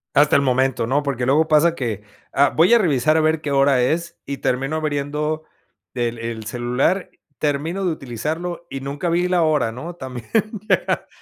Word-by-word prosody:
Hasta 150 +3 +5
el 140 - +5
momento, 130 -3 +1
¿no? 145 +3 +1
Porque, 135 -3 -2
luego 155 +4 +3
pasa 160 +2 +4
que, 115 -9 -3 0.3
ah, 140 0 +4
voy 170 +8 +5
a 235 - +7
revisar 155 - +2
a - - +4
ver 155 0 +1
qué 150 - -3
hora 135 -2 +4
es, 170 +6 -1
y 140 0 -4
termino 135 +5 -1
abriendo 150 +1 -2 0.5
el 120 -1 -2
el 115 -1 -5
celular, 125 - 0 0.3
termino 155 +6 -1
de 180 - +1
utilizarlo, 160 +6 -4
y 135 - -5
nunca 145 +5 -3
vi 175 +2 +1
la 180 -2 +2
hora, 150 -7 +2
¿no? 155 +9 -7
También 130 -7 -8 0.4
llega - - +1
145 Hz, 180 wpm, -21 LUFS, 130-160 Hz, 0.5 s, a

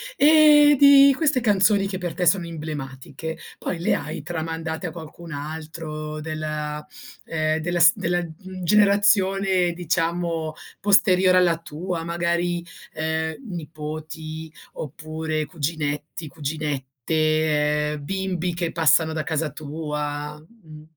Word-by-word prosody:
Ehm, 295 - +7
di 280 0 +8
queste 295 -4 +1
canzoni 205 -2 +3
che 195 - -4
per 175 -3 -4
te 180 - -1
sono 175 0 +3
emblematiche 155 -1 -6 0.2
poi 175 - -3
le 170 - +1
hai 150 -1 -4
tramandate 160 +1 -4
a - - -5
qualcun 165 +1 -10
altro 155 +1 -6
della 150 -1 -4 0.4
ehm, 155 -1 0
della 175 +2 -1
st 170 +2 +6
della, 175 -2 0
mhmm, 185 +3 -9
generazione, 195 -2 +3
diciamo, 170 -1 -1 0.3
posteriore 190 -2 +4
alla 175 -2 +3
tua, 165 +1 -5
magari, 170 +1 -1 0.3
ehm, 160 0 -2
nipoti 155 -1 -7 0.2
oppure 155 +1 -4
cuginetti, 150 0 -4
cuginette, 150 +1 -1
ehm, 145 - -7
bimbi 180 0 -2
che 170 -1 -2
passano 160 0 +3
da 155 -1 -2
casa 160 -1 -1
tua? 150 -1 -5
Mh. 160 -3 -15
160 Hz, 115 wpm, -23 LUFS, 155-180 Hz, 0.4 s, di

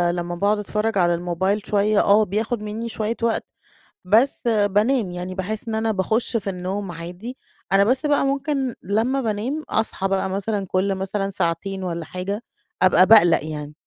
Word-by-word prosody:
لمّا 175 0 -3
باقعُد 205 +4 +1
أتفرّج 210 +1 -1
على 175 -2 +3
الموبايل 180 +4 -1
شوية 205 0 +2
آه، 210 +2 +5
بياخُد 215 +3 -2
منّي 215 +2 -4
شوية 220 0 -2
وقت 230 -1 0 0.6
بس 225 +9 +3
بانام، 210 0 +2
يعني 180 +1 -5
باحس 210 +4 -4
إن 225 - -2
أنا 220 0 0
باخُش 220 +4 0
في 200 -2 -3
النوم 190 +1 -4
عادي، 175 +9 -8 0.3
أنا 195 +1 +5
بس 255 +7 +1
بقى 290 -1 +2
ممكن 275 -2 -1
لمّا 225 +8 0
بانام 235 +7 -2
أصحى 220 -3 -1
بقى 195 0 0
مثلًا 200 +1 -2
كل 190 +2 0
مثلًا 195 +1 -2
ساعتين 190 +1 -2
والّا 170 -2 -4
حاجة 200 +6 -4 0.4
أبقى 185 0 +6
باقلَق 175 -8 +6
يعني. 150 -1 -6
205 Hz, 165 wpm, -22 LUFS, 185-225 Hz, 0.6 s, أبقى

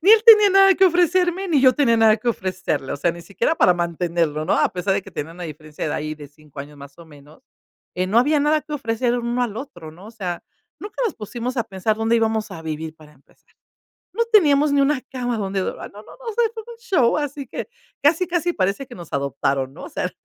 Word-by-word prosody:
ni 390 - +5
él 445 -1 +7
tenía 425 -3 +9
nada 390 0 +6
que 385 - +4
ofrecerme 360 +1 +2
ni 295 -5 +3
yo 255 -1 +7
tenía 240 -6 +3
nada 220 -1 +5
que 240 - -3
ofrecerle, 185 - -2
o - - -3
sea, 170 +4 +1
ni 170 0 -11
siquiera 200 - -1
para 180 - +4
mantenerlo, 170 -3 -1
¿no?, 175 - 0
a - - +3
pesar 185 +2 -2
de 200 - -1
que 195 - -13
tenía 165 -2 -6
una 175 +1 -8
diferencia 155 -1 -6
de - - -2
ahí 155 +1 -4
de 150 -2 -12
5 150 -1 -13
años 145 +1 -11
más 140 +2 -13
o 170 - -13
menos, 150 - -17 0.5
eh, 185 +1 -1
no 210 +5 +3
había 295 +5 +3
nada 300 +1 +2
que 300 +1 -7
ofrecer 240 -2 -1
el 245 - -1
uno 240 +1 -1
al 225 -4 -3
otro, 175 - -8
¿no?, 170 +5 -15
o 220 - -10
sea, 185 -6 -5 0.4
nunca 420 +4 -6
nos 440 - -1
pusimos 240 +4 -5
a 235 - 0
pensar 195 +2 -2
dónde 225 +1 +1
íbamos 220 -1 0
a 165 -4 -8
vivir, 160 0 -5
para 150 -1 -17
empezar. 140 -1 -29 0.7
No 465 - 0
teníamos 300 -10 +4
ni 280 - +3
una 275 0 +2
cama 245 -3 -2
donde 195 -1 -2
dor - - -3
ah, - - -7
no, 205 - -13
no, - - -16
no, - - -15
o - - -5
sea, 475 +2 +2
eso 445 0 -5
fue 475 +2 -11
un - - -28
show, 365 - +2
así 290 -1 -4
que - - -6 0.3
casi 320 +5 +3
casi 350 0 -1
parece 200 - -1
que 245 - -11
nos 170 -3 -11
adoptaron, 140 -1 -1
¿no?, - - -11
o - - -10
sea, - - -3
225 Hz, 255 wpm, -21 LUFS, -, 0.7 s, tenía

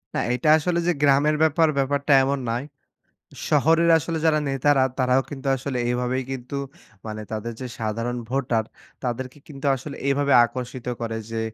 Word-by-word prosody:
।না, - - +1
এটা 125 +5 +1
আসলে 170 +2 0
যে, - - +4
গ্রামের 145 +2 +4
ব্যাপার 160 +1 +3
ব্যাপারটা 140 +1 +1
এমন 140 +1 0
নয়। 120 +4 -2 0.8
শহরের 165 +2 +4
আসলে 160 +2 -3
যারা 155 -1 +4
নেতারা 135 0 +3
তারাও 130 +1 +3
কিন্তু 140 -1 -7
আসলে 130 0 -4
এভাবেই 125 +1 -1
কিন্তু, 130 +2 -6 0.5
মানে 110 0 -5
তাদের 110 +2 -4
যে, 130 - -4
সাধারণ 115 +2 -2
ভোটার 125 -4 0 0.4
তাদেরকে 125 +3 -4
কিন্তু 140 -1 -6
আসলে 140 +2 -8
এভাবে 140 0 +2
আকর্ষিত 125 0 -6
করে। 115 -1 -3
যে, 115 0 -2
135 Hz, 155 wpm, -23 LUFS, 125-145 Hz, 0.8 s, যে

